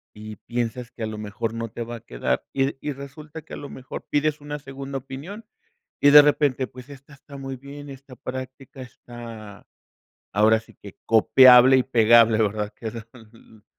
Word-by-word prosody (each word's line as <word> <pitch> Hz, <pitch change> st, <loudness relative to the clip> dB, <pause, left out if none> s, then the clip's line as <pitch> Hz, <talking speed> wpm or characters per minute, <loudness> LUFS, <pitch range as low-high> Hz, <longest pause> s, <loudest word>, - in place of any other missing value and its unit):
y 105 Hz, 0 st, -9 dB
piensas 120 Hz, +2 st, -4 dB
que 115 Hz, -, -8 dB
a -, -, 0 dB
lo 110 Hz, -1 st, -6 dB
mejor 105 Hz, +2 st, -4 dB
no 115 Hz, -1 st, -5 dB
te 120 Hz, +1 st, -6 dB
va 120 Hz, +1 st, -7 dB
a -, -, -13 dB
quedar, 65 Hz, -, -3 dB
y 135 Hz, +1 st, 0 dB
y 150 Hz, -, -3 dB
resulta 150 Hz, +3 st, -10 dB
que -, -, -14 dB
a -, -, -5 dB
lo 145 Hz, -, -9 dB
mejor 130 Hz, 0 st, -9 dB
pides 150 Hz, 0 st, 0 dB
una 145 Hz, 0 st, -6 dB
segunda 135 Hz, 0 st, -7 dB
opinión, 145 Hz, -, -9 dB, 0.6 s
y 145 Hz, -, +6 dB
de 150 Hz, 0 st, +10 dB
repente, 145 Hz, -3 st, +1 dB
pues 125 Hz, +2 st, -14 dB
esta 140 Hz, +1 st, -14 dB
está 140 Hz, 0 st, -13 dB
muy 135 Hz, -1 st, -6 dB
bien, 140 Hz, +2 st, -11 dB
está 135 Hz, -1 st, -13 dB
práctica, 130 Hz, +2 st, -8 dB
está, 115 Hz, -4 st, -11 dB, 0.7 s
ahora 110 Hz, +2 st, +4 dB
sí 110 Hz, -, -20 dB
que, -, -, -14 dB
copiable 125 Hz, +3 st, +7 dB
y 130 Hz, -, +2 dB
pegable, 115 Hz, -2 st, +4 dB
¿verdad?, 105 Hz, -1 st, -1 dB
que 110 Hz, -2 st, -6 dB
son 115 Hz, -1 st, -14 dB
125 Hz, 185 wpm, -23 LUFS, 115-140 Hz, 0.7 s, de